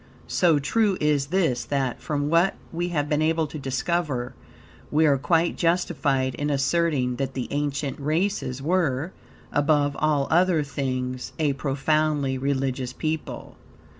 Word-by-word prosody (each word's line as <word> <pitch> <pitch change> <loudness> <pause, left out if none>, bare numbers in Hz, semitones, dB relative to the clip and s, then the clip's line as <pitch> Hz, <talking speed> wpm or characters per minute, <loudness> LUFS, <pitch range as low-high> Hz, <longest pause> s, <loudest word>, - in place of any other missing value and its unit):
So 170 -4 +3
true 195 +7 +1
is 150 -2 +1
this 155 -8 +1
that, 135 -3 -1
from 145 -1 -1
what 170 +3 +3 0.2
we 175 +1 -2
have 150 -4 -1
been 150 0 +1
able 160 +1 +2
to 150 +1 -7
discover, 135 -1 -1 0.6
we 155 +2 +3
are 140 -3 +3
quite 165 +4 +1
justified 150 -6 +1
in 145 +1 -2
asserting 140 -2 +1
that 135 -1 -3
the 130 - -3
ancient 145 -1 -2
races 155 -3 -1
were, 160 -2 0 0.4
above 145 -1 +2
all 150 -3 +2
other 175 -2 +3
things, 130 -2 -3
a 150 -3 +1
profoundly 145 0 0
religious 130 -2 -1
people. 155 0 -4
145 Hz, 135 wpm, -25 LUFS, 135-160 Hz, 0.6 s, So